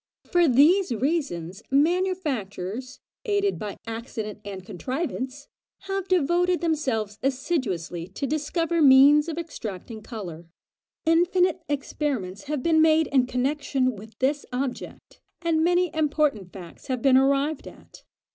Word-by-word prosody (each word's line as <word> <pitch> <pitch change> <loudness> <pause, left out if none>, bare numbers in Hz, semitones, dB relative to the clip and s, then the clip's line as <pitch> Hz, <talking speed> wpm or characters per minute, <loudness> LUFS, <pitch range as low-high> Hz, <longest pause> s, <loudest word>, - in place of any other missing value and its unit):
For 350 -1 +4
these 300 +7 +4
reasons 225 - -2
manufacturers, 275 - -1 0.2
aided 405 -2 0
by 210 -2 -5
accident 225 -2 -6
and 195 -2 -7
contrivance, 260 - -4 0.3
have 390 -1 -3
devoted 355 +1 +2
themselves 255 - -1
assiduously 245 - -2
to 195 +9 -5
discover 320 +4 -1
means 290 +3 +7
of 320 - -5
extracting 225 - -6
colour: 175 -8 -8 0.6
infinite 355 +2 +3
experiments 270 -8 -3
have 295 -3 -3
been 320 -1 +4
made 315 0 +4
in 260 -3 +3
connexion 260 -1 0
with 215 +2 -13
this 280 +2 0
object, 250 0 -5 0.2
and 325 -1 +2
many 355 0 +2
important 295 - 0
facts 175 -4 -12
have 255 -3 -2
been 270 -2 +5
arrived 275 +3 +2
at. - - -14
275 Hz, 120 wpm, -25 LUFS, 225-325 Hz, 0.6 s, means